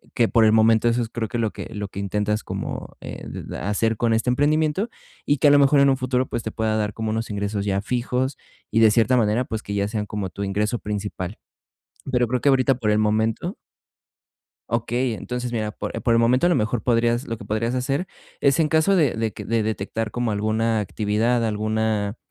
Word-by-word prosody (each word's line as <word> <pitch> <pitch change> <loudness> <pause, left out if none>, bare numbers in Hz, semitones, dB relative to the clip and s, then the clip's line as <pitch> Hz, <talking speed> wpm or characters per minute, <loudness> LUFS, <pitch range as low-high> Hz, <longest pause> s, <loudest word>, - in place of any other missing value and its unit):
que 115 - +3
por 115 -1 +4
el 110 - +5
momento 110 +1 +4
eso 120 +1 +2
es 110 - -6
creo 115 -1 -3
que 120 +2 -4
lo 110 -2 0
que - - -7
lo 105 -1 -3
que 100 - -7
intentas 105 +1 -1
como, - - -5
eh, - - -8
d - - -7
d - - -7
hacer 105 +4 0
con 115 0 +1
este 115 +3 +1
emprendimiento, 155 - +1 0.4
y 145 - +2
que 150 - +5
a - - +6
lo 145 - +6
mejor 140 0 +5
en 140 - +5
un 135 - +2
futuro, 130 0 0
pues, 120 - -3
te 110 - -4
pueda 110 0 -1
dar 105 -1 -1
como 110 -1 -3
unos 115 +1 -2
ingresos 100 0 -2
ya 100 -1 0
fijos, 125 +3 -1 0.3
y 110 - +2
de 110 -1 +6
cierta 120 +3 +3
manera, 110 +2 +2
pues, 110 -1 -4
que 100 - -4
ya 100 0 +1
sean 105 -1 -2
como 100 -3 -4
tu 100 +4 -6
ingreso 105 +4 -1
principal. 105 -2 -4 0.7
Pero 125 -1 +2
creo 125 +1 -1
que 145 - +3
ahorita, 135 0 +3
por 110 -3 0
el 105 - +3
momento 110 +1 0 1.1
Okey, 120 +2 0
entonces, 125 +2 -4
mira, 110 -2 -1
po - - -6
por 115 - +2
el 115 - +4
momento 125 +7 +3
a - - +5
lo 175 - +3
mejor 110 +1 0
podrías 120 +2 +2
lo 115 -1 -3
que - - -10
podrías 115 +4 -1
hacer 135 +8 -1 0.3
es 140 +3 +3
en 160 - +4
caso 160 +5 +3
de 150 -8 +3
de 110 -1 -1
q - - -8
de 115 -1 0
detectar 110 +1 -3
como 120 -1 -1
alguna 110 +2 0
actividad, 110 +4 0
alguna, 110 0 -1
115 Hz, 225 wpm, -23 LUFS, 105-125 Hz, 1.1 s, a